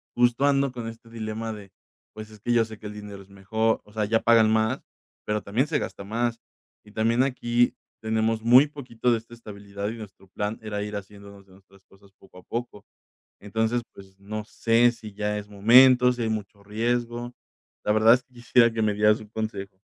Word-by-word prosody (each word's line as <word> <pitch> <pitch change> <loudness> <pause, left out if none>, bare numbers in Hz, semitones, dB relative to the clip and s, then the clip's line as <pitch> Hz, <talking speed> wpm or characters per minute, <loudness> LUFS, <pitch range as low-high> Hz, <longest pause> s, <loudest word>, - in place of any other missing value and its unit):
justo 120 +3 +3
ando 140 -2 +2
con 120 -2 -6
este 115 0 -10
dilema 110 0 -5
de, 100 -3 -11 0.4
pues, 110 0 -10
es 105 - -14
que 120 - -2
yo 115 -1 +3
sé 110 -1 -11
que 105 - -8
el 105 - -8
dinero 105 -1 -9
es 95 - -18
mejor, 110 +3 -1
o 105 - -19
sea, 110 - -3
allá 110 +2 +2
pagan 115 -2 +5
más, 110 0 +1 0.4
pero 105 0 -1
también 120 +9 0
se 160 - 0
gasta 100 - -6
más, 115 +3 -2 0.4
y 105 - -17
también 115 +3 +1
aquí 120 -2 +1 0.3
tenemos 110 0 0
muy 125 +5 +7
poquito 125 -4 -2
de 115 - +2
esta 115 +1 -15
estabilidad, 100 -2 -7
y 115 - -6
nuestro 100 -3 -12
plan 105 +3 -4
era 105 -1 -4
ir 105 0 -5
haciéndonos 100 0 -10
de 95 - -21
nuestras 95 0 -22
cosas 95 0 -22
poco 90 -1 -17
a 90 - -17
poco. 120 -3 -6 0.6
Entonces, 110 +3 -1
pues, 95 -1 -15
no 105 +1 -6
sé 115 +2 +3
si 110 -3 -11
ya 105 0 -2
es 105 0 -8
momento, 125 +4 +6
si 120 - -6
hay 110 - 0
mucho 100 -2 -5
riesgo. 120 +3 -2 0.5
La 105 - +1
verdad 110 +2 +6
es 125 - +1
que 130 - -33
quisiera 120 0 +3
que 110 0 -2
me 105 -1 +2
dieras 105 +1 +3
un 110 - -12
consejo. 100 -3 -5
110 Hz, 210 wpm, -25 LUFS, 105-120 Hz, 0.6 s, muy